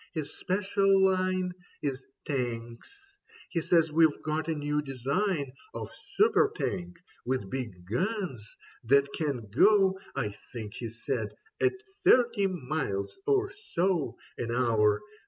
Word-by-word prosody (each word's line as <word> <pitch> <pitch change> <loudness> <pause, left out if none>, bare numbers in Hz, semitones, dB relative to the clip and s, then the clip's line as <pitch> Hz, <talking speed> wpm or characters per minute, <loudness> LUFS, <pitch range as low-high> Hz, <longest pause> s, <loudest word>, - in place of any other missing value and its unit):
His 155 -3 -3
special 195 +1 +2
line 185 -1 +1 0.3
Is 135 -2 -2 0.2
Tanks. 120 -4 -3 0.6
He 170 - 0
says 165 -1 +3
we've 160 -1 +4
got 155 0 -1
a 165 - 0
new 150 0 0
design 140 - -1 0.2
Of - - -5
super 415 +1 +2
Tank, 180 - -3 0.3
with 125 -6 -2
big 115 -9 -5
guns, 130 - -3 0.3
that 140 +4 +5
can 140 -8 -2
go 190 - +5 0.2
(I 105 - 0 0.2
think 110 -3 -6
he 115 -1 -5
said) 120 -1 -3 0.3
at 390 - +4 0.3
thirty 235 -5 +5
miles 150 - -3
or 400 -1 +3
so 190 - -1 0.2
An 120 - -2
hour. 110 -4 +3
155 Hz, 125 wpm, -29 LUFS, 125-190 Hz, 0.6 s, that